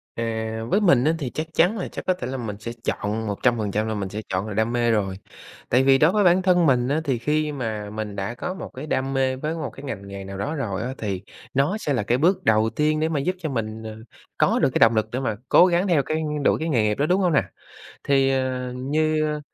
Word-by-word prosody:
À, 110 Hz, -1 st, -3 dB
với 210 Hz, -, +2 dB
mình 140 Hz, -11 st, +4 dB
á 160 Hz, +2 st, +3 dB
thì 130 Hz, -4 st, -3 dB
chắc 155 Hz, +4 st, -4 dB
chắn 185 Hz, +7 st, +3 dB
là 185 Hz, -, -3 dB
chắc -, -, -8 dB
có 185 Hz, -, +3 dB
thể 125 Hz, -8 st, -6 dB
là 135 Hz, +1 st, -4 dB
mình 105 Hz, -4 st, -5 dB
sẽ 115 Hz, +1 st, -5 dB
chọn 110 Hz, -2 st, -2 dB
100% 105 Hz, 0 st, 0 dB
là 110 Hz, -, -1 dB
mình 100 Hz, -2 st, -3 dB
sẽ 105 Hz, +2 st, -5 dB
chọn 95 Hz, +3 st, -1 dB
là 105 Hz, -, -5 dB
đam 110 Hz, +3 st, 0 dB
mê 120 Hz, -1 st, +2 dB
rồi, 100 Hz, -4 st, 0 dB, 0.5 s
tại 125 Hz, +2 st, +4 dB
vì 135 Hz, 0 st, +5 dB
đối 155 Hz, +5 st, +4 dB
với 210 Hz, 0 st, +2 dB
bản 180 Hz, 0 st, +5 dB
thân 180 Hz, -2 st, +3 dB
mình 125 Hz, -4 st, +3 dB
á 150 Hz, +3 st, 0 dB
thì 135 Hz, -5 st, 0 dB
khi 150 Hz, +5 st, 0 dB
mà 110 Hz, -7 st, -4 dB
mình 105 Hz, -1 st, -5 dB
đã 100 Hz, +3 st, -3 dB
có 180 Hz, -, -4 dB
một 190 Hz, -, -7 dB
cái 140 Hz, +4 st, -7 dB
đam 135 Hz, -2 st, -1 dB
mê 130 Hz, -1 st, +1 dB
với 150 Hz, +4 st, -3 dB
một 160 Hz, -, -4 dB
cái 135 Hz, -, -12 dB
ngành 105 Hz, -8 st, -6 dB
nghề 100 Hz, 0 st, -7 dB
nào 95 Hz, 0 st, -7 dB
đó 105 Hz, +11 st, -3 dB
rồi 100 Hz, -9 st, -3 dB
á 125 Hz, +3 st, -3 dB
thì 100 Hz, -4 st, -3 dB, 0.3 s
nó 145 Hz, +10 st, +1 dB
sẽ 145 Hz, -9 st, -2 dB
là 120 Hz, -, 0 dB
cái 120 Hz, +4 st, +1 dB
bước 175 Hz, +7 st, +2 dB
đầu 110 Hz, 0 st, +3 dB
tiên 155 Hz, 0 st, +2 dB
để 160 Hz, +1 st, +1 dB
mà 155 Hz, -, 0 dB
giúp 180 Hz, +7 st, -1 dB
cho 160 Hz, -, -3 dB
mình, 110 Hz, -3 st, -4 dB
à, 110 Hz, -1 st, -7 dB, 0.4 s
có -, -, +3 dB
được -, -, +3 dB
cái -, -, -1 dB
động 115 Hz, 0 st, +6 dB
lực 110 Hz, 0 st, +1 dB
để 125 Hz, -, -2 dB
mà 115 Hz, -5 st, -1 dB
cố -, -, +7 dB
gắng 180 Hz, +1 st, +2 dB
theo 160 Hz, -6 st, +3 dB
cái 155 Hz, +2 st, -2 dB, 0.2 s
đuổi -, -, +3 dB
cái 160 Hz, -, -2 dB
nghề 120 Hz, -8 st, +2 dB
nghiệp 105 Hz, 0 st, +1 dB
đó, 145 Hz, -, +1 dB
đúng 185 Hz, +4 st, +2 dB
hông 180 Hz, -3 st, +2 dB
nè? 140 Hz, -, +4 dB, 0.6 s
Thì, 135 Hz, -1 st, +3 dB
à, 130 Hz, -1 st, -1 dB
như, 155 Hz, +4 st, 0 dB
ơ, 150 Hz, -, -4 dB
130 Hz, 270 wpm, -23 LUFS, 110-155 Hz, 0.6 s, cố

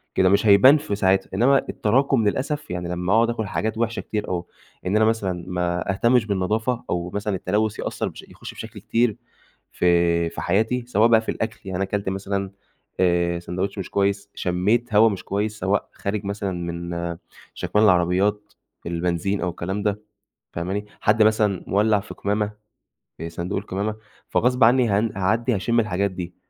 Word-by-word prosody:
كده، 95 Hz, -, +4 dB
مش 100 Hz, +3 st, +3 dB
هيبان 120 Hz, +9 st, +7 dB
في 145 Hz, -9 st, -3 dB
ساعتها. 95 Hz, -1 st, +2 dB
إنّما 130 Hz, +7 st, +4 dB
التراكم 125 Hz, 0 st, +2 dB
للأسف 145 Hz, -, -2 dB
يعني 90 Hz, -1 st, -4 dB
لمّا 90 Hz, +2 st, -1 dB
أقعد 115 Hz, +1 st, +4 dB
أكل 110 Hz, -2 st, -2 dB
حاجات 110 Hz, +3 st, -2 dB
وحشة 115 Hz, 0 st, -1 dB
كتير، 105 Hz, -1 st, -4 dB
أو 90 Hz, -1 st, -3 dB, 0.4 s
إن 95 Hz, +3 st, 0 dB
أنا 110 Hz, 0 st, +4 dB
مثلًا 95 Hz, -6 st, -1 dB
ما 90 Hz, +1 st, -1 dB
أهتمش 120 Hz, +2 st, +3 dB
بالنضافة 110 Hz, +5 st, -1 dB
أو 90 Hz, 0 st, -2 dB
مثلًا 105 Hz, 0 st, -2 dB
التلوث 105 Hz, +4 st, -1 dB
يأثّر -, -, -2 dB
بش -, -, -11 dB
يخش -, -, -10 dB
بشكل -, -, -9 dB
كتير 115 Hz, -2 st, +1 dB, 0.5 s
في 85 Hz, -1 st, +2 dB
في -, -, -7 dB
حياتي 110 Hz, +6 st, 0 dB
سواء 110 Hz, -1 st, +4 dB
بقى 115 Hz, -1 st, +5 dB
في -, -, -7 dB
الأكل 110 Hz, 0 st, -4 dB
يعني 95 Hz, -2 st, -3 dB
أنا 95 Hz, -, 0 dB
كلت 100 Hz, 0 st, -2 dB
مثلًا 100 Hz, 0 st, -3 dB, 0.5 s
آآ 85 Hz, -1 st, +2 dB
سندوتش 90 Hz, +4 st, -4 dB
مش 95 Hz, -, -5 dB
كويس، 100 Hz, 0 st, 0 dB
شمّيت 105 Hz, +7 st, 0 dB
هوا 110 Hz, +2 st, +7 dB
مش 100 Hz, -, -5 dB
كويس 105 Hz, +2 st, -2 dB
سواء 95 Hz, +3 st, 0 dB
خارج 100 Hz, 0 st, -3 dB
مثلًا 100 Hz, -1 st, -3 dB
من 85 Hz, -1 st, -4 dB, 0.4 s
شَكمان 105 Hz, +1 st, +1 dB
العربيات، 95 Hz, +3 st, +2 dB, 0.3 s
البنزين 85 Hz, +3 st, -1 dB
أو 90 Hz, -, 0 dB
الكلام 95 Hz, +4 st, -4 dB
ده، 105 Hz, 0 st, -1 dB, 0.5 s
فاهماني؟ 95 Hz, +5 st, -3 dB, 0.2 s
حد 110 Hz, +1 st, +4 dB
مثلًا 105 Hz, -3 st, +2 dB
مولّع 105 Hz, +1 st, +3 dB
في 105 Hz, -, -9 dB
قمامة، 105 Hz, +1 st, -1 dB, 0.7 s
في 85 Hz, +1 st, -5 dB
صندوق 85 Hz, +4 st, -3 dB
القمامة. 105 Hz, +2 st, -3 dB, 0.3 s
فغصب 125 Hz, 0 st, +3 dB
عنّي 120 Hz, 0 st, +4 dB
هن 105 Hz, +3 st, +1 dB
هاعدّي 115 Hz, +5 st, +1 dB
هاشمّ 115 Hz, +4 st, +1 dB
الحاجات 100 Hz, -2 st, 0 dB
دي، 90 Hz, -1 st, -7 dB
100 Hz, 170 wpm, -23 LUFS, 90-110 Hz, 0.7 s, هيبان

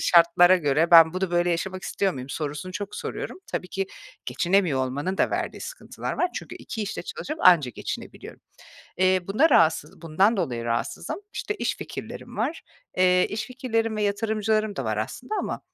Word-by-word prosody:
şartlara 175 Hz, +1 st, +6 dB
göre 160 Hz, +1 st, +1 dB
ben 165 Hz, -1 st, +9 dB
bunu 185 Hz, -1 st, -1 dB
böyle 175 Hz, 0 st, +2 dB
yaşamak 185 Hz, +2 st, -2 dB
istiyor 195 Hz, -1 st, 0 dB
muyum” 130 Hz, -1 st, -7 dB
sorusunu 150 Hz, +5 st, -4 dB
çok 205 Hz, +2 st, -5 dB
soruyorum. -, -, -5 dB
Tabii 180 Hz, -, -3 dB
ki 195 Hz, +1 st, -2 dB, 0.4 s
geçinemiyor 175 Hz, -8 st, +1 dB
olmanın 145 Hz, +9 st, -3 dB
da -, -, +2 dB
verdiği -, -, -3 dB
sıkıntılar -, -, -6 dB
var. 355 Hz, -, +1 dB
Çünkü -, -, -6 dB
2 220 Hz, -, -5 dB
işte 200 Hz, -, -4 dB
çalışıp 305 Hz, +2 st, -6 dB
anca 165 Hz, -8 st, +6 dB
geçinebiliyorum. -, -, -7 dB, 0.6 s
Eee, 185 Hz, 0 st, +4 dB
bunda 275 Hz, +12 st, +3 dB
rahatsız 160 Hz, -, +2 dB
bundan 190 Hz, +8 st, +2 dB
dolayı 125 Hz, -10 st, -2 dB
rahatsızım. 120 Hz, -, -2 dB, 0.2 s
İşte, 420 Hz, -, -3 dB
iş -, -, -2 dB
fikirlerim -, -, -8 dB
var. 330 Hz, -, -2 dB, 0.4 s
Eee, 180 Hz, 0 st, +4 dB
iş 215 Hz, +1 st, -4 dB
fikirlerim 225 Hz, -4 st, -2 dB
ve 210 Hz, -, -1 dB
yatırımcılarım 215 Hz, 0 st, 0 dB
da 135 Hz, -, -3 dB
var 110 Hz, -1 st, -1 dB
aslında 180 Hz, -, -4 dB
ama -, -, -4 dB
185 Hz, 170 wpm, -25 LUFS, 160-215 Hz, 0.6 s, ben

